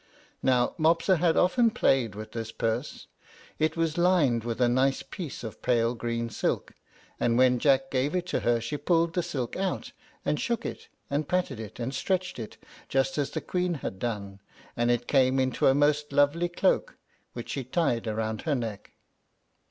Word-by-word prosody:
Now 125 Hz, -2 st, +2 dB
Mopsa 165 Hz, +4 st, +3 dB
had 165 Hz, 0 st, +2 dB
often 230 Hz, +6 st, +4 dB
played 135 Hz, -, +1 dB
with 110 Hz, +1 st, -8 dB
this 115 Hz, -1 st, -5 dB
purse. 115 Hz, +5 st, -3 dB, 0.5 s
It 155 Hz, +2 st, +1 dB
was 165 Hz, 0 st, 0 dB
lined 160 Hz, -10 st, +3 dB
with 115 Hz, 0 st, -3 dB
a 125 Hz, -, +4 dB
nice 130 Hz, +3 st, +2 dB
piece 165 Hz, -10 st, -7 dB
of 110 Hz, -, -7 dB
pale 115 Hz, -1 st, +2 dB
green 115 Hz, -1 st, -3 dB
silk, -, -, -2 dB, 0.5 s
and 115 Hz, 0 st, +2 dB
when 125 Hz, -1 st, +4 dB
Jack 135 Hz, -1 st, +3 dB
gave 135 Hz, +5 st, 0 dB
it 180 Hz, -1 st, 0 dB
to -, -, 0 dB
her 120 Hz, -1 st, +2 dB
she 115 Hz, +6 st, -3 dB
pulled 165 Hz, +2 st, +1 dB
the 180 Hz, -, +1 dB
silk 145 Hz, -9 st, -4 dB
out, 190 Hz, -1 st, -2 dB, 0.3 s
and 150 Hz, -, 0 dB
shook 235 Hz, -2 st, -1 dB
it, -, -, -6 dB, 0.2 s
and 145 Hz, +1 st, 0 dB
patted 180 Hz, -8 st, -1 dB
it, 110 Hz, 0 st, -8 dB
and 120 Hz, +3 st, -3 dB
stretched 185 Hz, +3 st, -1 dB
it, 110 Hz, -, -7 dB, 0.3 s
just 135 Hz, +5 st, +1 dB
as 140 Hz, -, 0 dB
the -, -, -4 dB
Queen 180 Hz, -1 st, -1 dB
had 95 Hz, -9 st, -5 dB
done, 100 Hz, -4 st, -4 dB, 0.4 s
and 120 Hz, 0 st, +1 dB
it 120 Hz, 0 st, +1 dB
came 130 Hz, -1 st, +3 dB
into 130 Hz, -1 st, +2 dB
a 135 Hz, -, +5 dB
most 145 Hz, 0 st, +2 dB
lovely 145 Hz, +5 st, +3 dB
cloak, 180 Hz, +2 st, +1 dB, 0.4 s
which 120 Hz, -, -7 dB
she 135 Hz, -, -3 dB
tied 125 Hz, -4 st, 0 dB
round 110 Hz, 0 st, -2 dB
her 155 Hz, -3 st, 0 dB
neck. 115 Hz, -5 st, -5 dB
135 Hz, 185 wpm, -28 LUFS, 120-165 Hz, 0.5 s, a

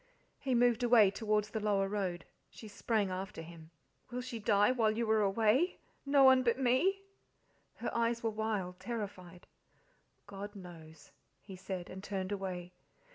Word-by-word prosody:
He 265 Hz, -3 st, -1 dB
moved 240 Hz, 0 st, +3 dB
away 235 Hz, -5 st, +5 dB
towards 210 Hz, 0 st, -1 dB
the 220 Hz, -, -2 dB
lower 205 Hz, -2 st, +1 dB
road. 190 Hz, -4 st, -3 dB, 0.2 s
She 220 Hz, -, -12 dB
sprang 205 Hz, -1 st, -1 dB
after 190 Hz, -2 st, -5 dB
him. 165 Hz, -1 st, -12 dB, 0.4 s
"Will 250 Hz, +1 st, -4 dB
she 250 Hz, -2 st, -6 dB
die 205 Hz, +1 st, +3 dB
while 230 Hz, -4 st, +2 dB
you 225 Hz, +2 st, -1 dB
are 220 Hz, -1 st, +3 dB
away? 220 Hz, -, +2 dB, 0.3 s
no 280 Hz, -1 st, +5 dB
one 260 Hz, -1 st, +7 dB
but 240 Hz, -1 st, +1 dB
me." 270 Hz, +10 st, +2 dB, 0.7 s
Her -, -, -5 dB
eyes 235 Hz, 0 st, 0 dB
were 225 Hz, -, 0 dB
wild, 210 Hz, -4 st, -3 dB
terrified. 190 Hz, -6 st, -6 dB, 0.8 s
"God 205 Hz, +1 st, -8 dB
knows!" 160 Hz, -5 st, -12 dB, 0.3 s
he 195 Hz, -, -10 dB
said, 185 Hz, -1 st, -6 dB
and 190 Hz, +1 st, -9 dB
turned 190 Hz, -1 st, -4 dB
away. 180 Hz, -3 st, -5 dB
210 Hz, 155 wpm, -33 LUFS, 190-235 Hz, 0.8 s, one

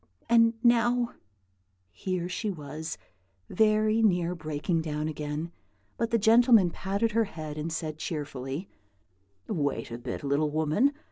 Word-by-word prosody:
And 230 Hz, 0 st, +5 dB
now 240 Hz, 0 st, +3 dB, 0.4 s
" 95 Hz, 0 st, -44 dB
Here 180 Hz, -, -3 dB
she 185 Hz, +4 st, -3 dB
was 160 Hz, -2 st, -6 dB, 0.5 s
very 215 Hz, 0 st, +3 dB
near 180 Hz, -5 st, +2 dB
breaking 155 Hz, +1 st, -2 dB
down 150 Hz, -1 st, -3 dB
again; 150 Hz, +2 st, -4 dB, 0.4 s
but 230 Hz, -, -1 dB
the 230 Hz, -, +3 dB
gentleman 225 Hz, -3 st, +5 dB
patted 200 Hz, +6 st, -1 dB
her 225 Hz, +1 st, +2 dB
head 155 Hz, -6 st, -7 dB
and 155 Hz, +2 st, -4 dB
said, 155 Hz, -1 st, -4 dB
cheerfully, 145 Hz, +1 st, -4 dB, 0.8 s
"Wait 145 Hz, -5 st, -2 dB
a 115 Hz, -, -5 dB
bit, 120 Hz, +3 st, -5 dB
little 145 Hz, +2 st, +1 dB
woman! 160 Hz, -, +2 dB
170 Hz, 135 wpm, -28 LUFS, 150-220 Hz, 0.8 s, And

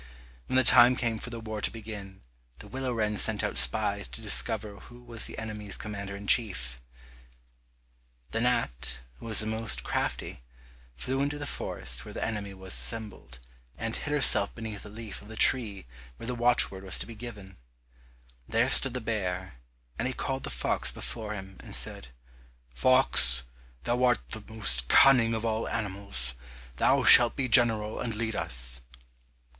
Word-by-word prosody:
When -, -, -3 dB
the 130 Hz, -, +5 dB
time 120 Hz, +1 st, +7 dB
came 115 Hz, -3 st, -2 dB
for -, -, -5 dB
the 115 Hz, -1 st, -7 dB
war 110 Hz, -1 st, -6 dB
to -, -, 0 dB
begin, 105 Hz, -4 st, -10 dB, 0.4 s
the -, -, -11 dB
willow 130 Hz, -1 st, -4 dB
wren 105 Hz, -3 st, -1 dB
sent 105 Hz, 0 st, +3 dB
out -, -, -3 dB
spies 60 Hz, 0 st, +4 dB
to -, -, -11 dB
discover 105 Hz, -1 st, 0 dB
who 120 Hz, +5 st, -15 dB
was 115 Hz, -2 st, -1 dB
the -, -, -8 dB
enemy's 105 Hz, -2 st, -5 dB
commander 100 Hz, -2 st, -7 dB
in 100 Hz, +1 st, -10 dB
chief. 90 Hz, -, +1 dB, 1.5 s
The 115 Hz, -, -2 dB
gnat, 65 Hz, -, -1 dB, 0.2 s
who -, -, -10 dB
was 110 Hz, -2 st, +3 dB
the -, -, -3 dB
most 110 Hz, +1 st, -3 dB
crafty, -, -, -4 dB, 0.5 s
flew 130 Hz, -, -3 dB
into 145 Hz, +1 st, -2 dB
the 145 Hz, -, -6 dB
forest 60 Hz, -, -3 dB
where -, -, -11 dB
the -, -, -2 dB
enemy 105 Hz, -3 st, -5 dB
was 95 Hz, -1 st, -3 dB
assembled, 110 Hz, -, -3 dB, 0.4 s
and 115 Hz, 0 st, -4 dB
hid 145 Hz, -, -5 dB
herself 135 Hz, -8 st, +4 dB
beneath 110 Hz, -3 st, -7 dB
a 105 Hz, -, -10 dB
leaf 110 Hz, 0 st, -9 dB
of 105 Hz, -, -15 dB
the 110 Hz, -, -10 dB
tree 105 Hz, -, +2 dB, 0.3 s
where -, -, -10 dB
the 125 Hz, -, -3 dB
watchword 120 Hz, -5 st, +1 dB
was 95 Hz, -, +2 dB
to -, -, -4 dB
be 115 Hz, -, -10 dB
given. 105 Hz, -4 st, -10 dB, 0.9 s
There 115 Hz, +3 st, +1 dB
stood 135 Hz, -1 st, +7 dB
the 125 Hz, -, -3 dB
bear, 95 Hz, -, -4 dB, 0.5 s
and 125 Hz, -, -1 dB
he 130 Hz, -, -5 dB
called 135 Hz, -1 st, -4 dB
the -, -, -6 dB
fox -, -, -1 dB
before 105 Hz, -, -6 dB
him 95 Hz, -1 st, -10 dB
and -, -, -3 dB
said, -, -, -2 dB, 0.7 s
"Fox, 60 Hz, -, +4 dB, 0.4 s
thou 120 Hz, +1 st, -1 dB
art 125 Hz, -4 st, +1 dB
the 110 Hz, -, -5 dB
most 80 Hz, -, -2 dB
cunning 120 Hz, -, +5 dB
of 110 Hz, +1 st, -4 dB
all 110 Hz, 0 st, -2 dB
animals, 95 Hz, -, -3 dB, 0.4 s
thou -, -, +2 dB
shalt 120 Hz, 0 st, +8 dB
be 135 Hz, -2 st, -2 dB
general 110 Hz, -3 st, +2 dB
and 115 Hz, -3 st, -4 dB
lead 110 Hz, 0 st, -3 dB
us." -, -, -1 dB
110 Hz, 170 wpm, -27 LUFS, 95-120 Hz, 1.5 s, shalt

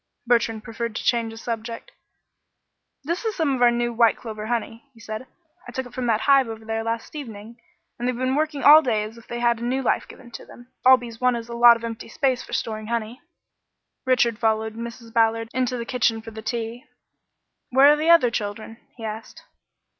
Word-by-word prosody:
Bertrand 230 Hz, -2 st, +1 dB
preferred 230 Hz, -1 st, -5 dB
to -, -, -4 dB
change 230 Hz, -2 st, +1 dB
the 225 Hz, -, -10 dB
subject. 230 Hz, -, -6 dB, 1.1 s
"This 340 Hz, -, -3 dB
is 440 Hz, -2 st, -2 dB
some 310 Hz, -5 st, +1 dB
of 255 Hz, -, -3 dB
our 245 Hz, -, +7 dB
new 240 Hz, 0 st, -1 dB
white 230 Hz, -1 st, +3 dB
clover 215 Hz, -2 st, -7 dB
honey," 235 Hz, +2 st, -4 dB
he -, -, -18 dB
said. 225 Hz, +2 st, -7 dB, 0.4 s
"I -, -, -7 dB
took 260 Hz, +1 st, -4 dB
it 245 Hz, -, -13 dB
from 255 Hz, -1 st, -3 dB
that 220 Hz, -1 st, +1 dB
hive 275 Hz, -1 st, +4 dB
over 225 Hz, 0 st, -8 dB
there 225 Hz, 0 st, -2 dB
last 230 Hz, +5 st, -4 dB
evening, 230 Hz, -4 st, -9 dB, 0.4 s
and 245 Hz, -, -2 dB
they've 250 Hz, -1 st, -1 dB
been 255 Hz, +1 st, 0 dB
working 300 Hz, 0 st, -1 dB
all 305 Hz, +2 st, +9 dB
day 220 Hz, -7 st, 0 dB
as 220 Hz, +2 st, -9 dB
if 230 Hz, -, -19 dB
they 240 Hz, -, -5 dB
had 235 Hz, -1 st, +2 dB
had 235 Hz, -, -4 dB
new 265 Hz, +2 st, -1 dB
life -, -, 0 dB
given 240 Hz, -3 st, -14 dB
them. 245 Hz, +1 st, -13 dB
All 260 Hz, 0 st, +8 dB
bees 235 Hz, -2 st, -10 dB
want 250 Hz, -1 st, +2 dB
is 230 Hz, 0 st, -8 dB
a -, -, -6 dB
lot 235 Hz, 0 st, +7 dB
of 230 Hz, -, -15 dB
empty 230 Hz, -1 st, -6 dB
space 255 Hz, +1 st, 0 dB
for -, -, -12 dB
storing 215 Hz, -1 st, -3 dB
honey." 235 Hz, +1 st, -3 dB, 0.8 s
Richard 240 Hz, -3 st, +2 dB
followed 220 Hz, -1 st, 0 dB
Mrs. 230 Hz, 0 st, -8 dB
Ballard 225 Hz, -1 st, +2 dB
into 255 Hz, 0 st, -1 dB
the 235 Hz, -, -4 dB
kitchen 235 Hz, -2 st, +1 dB
for 225 Hz, 0 st, -10 dB
the 220 Hz, 0 st, -8 dB
tea. 235 Hz, +3 st, -4 dB, 0.8 s
"Where 270 Hz, +3 st, +6 dB
are -, -, +5 dB
the 310 Hz, +2 st, -1 dB
other 335 Hz, -8 st, +6 dB
children?" 215 Hz, +1 st, -5 dB, 0.2 s
he 230 Hz, -, -10 dB
asked. 220 Hz, +1 st, -7 dB
235 Hz, 215 wpm, -23 LUFS, 225-255 Hz, 1.1 s, all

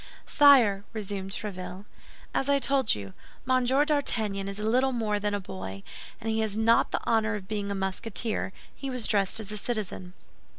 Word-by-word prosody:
"Sire," 245 Hz, -9 st, +6 dB
resumed 200 Hz, -3 st, -4 dB
Tréville, 195 Hz, -1 st, -6 dB, 0.5 s
"as 270 Hz, -, 0 dB
I 280 Hz, -, +5 dB
told 275 Hz, -3 st, +2 dB
you, 100 Hz, -2 st, -8 dB, 0.3 s
Monsieur 260 Hz, +2 st, +3 dB
d'Artagnan 220 Hz, -10 st, 0 dB
is 200 Hz, -, -5 dB
little 250 Hz, +5 st, +2 dB
more 215 Hz, -3 st, 0 dB
than 205 Hz, 0 st, -1 dB
a -, -, -1 dB
boy; 95 Hz, -, -7 dB, 0.4 s
and 225 Hz, -, -7 dB
as 220 Hz, -, +1 dB
he 220 Hz, -, 0 dB
has 215 Hz, -1 st, -1 dB
not 230 Hz, +1 st, +4 dB
the -, -, -2 dB
honor 225 Hz, -1 st, +1 dB
of 195 Hz, -2 st, -7 dB
being 205 Hz, -1 st, -3 dB
a 200 Hz, -, -2 dB
Musketeer, 195 Hz, +2 st, -2 dB, 0.2 s
he 275 Hz, -, -6 dB
was 250 Hz, -3 st, -1 dB
dressed 200 Hz, +1 st, +2 dB
as 215 Hz, -1 st, -7 dB
a 210 Hz, -, -5 dB
citizen. 195 Hz, -5 st, -4 dB
215 Hz, 180 wpm, -28 LUFS, 195-240 Hz, 0.5 s, Sire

